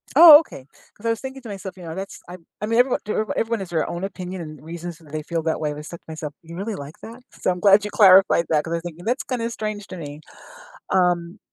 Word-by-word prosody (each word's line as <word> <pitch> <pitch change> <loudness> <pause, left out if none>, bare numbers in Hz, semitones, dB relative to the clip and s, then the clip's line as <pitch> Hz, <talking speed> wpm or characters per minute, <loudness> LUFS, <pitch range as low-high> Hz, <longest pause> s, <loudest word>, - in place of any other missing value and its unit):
Oh, 310 -1 +11
okay. 140 - -9 0.3
'Cause 220 - -15
I - - +2
was 230 - 0
thinking 265 0 -7
to 230 - -10
myself, 195 -2 -7
you 180 - -11
know, 165 0 -6
that's 195 +1 -7
I 180 - -8 0.2
I - - -1
mean, 230 +2 +2
everyone 250 +1 +3
d 210 - -3 0.2
everyone 225 -1 -1
has 190 - -6
their 165 -2 -1
own 175 +2 -5
opinion 185 -2 -5
and 155 -1 -9
reasons 170 0 -7
that 155 -4 -18
they 155 -1 -4
feel 165 0 -2
that 160 - -1
way. 150 -1 -2
I 150 - -8
said 170 +2 -9
to - - -45
myself, 155 -2 -6
"You 165 0 -11
really 200 +3 -4
like 145 +2 -9
that?" 235 +3 -10
So 185 - -1
I'm 180 - -4
glad 200 +1 +6
you 210 - -4
clarified 190 -4 +6
that 150 -2 +2
'cause 165 - -7
I - - +1
was - - -6
thinking, 175 +2 -8
"That's 245 +3 0
kinda 235 -3 -2
strange 215 -3 -5
to 185 - -8
me." 150 -1 -8 0.7
Um 180 +1 +1
180 Hz, 270 wpm, -22 LUFS, 165-215 Hz, 0.7 s, Oh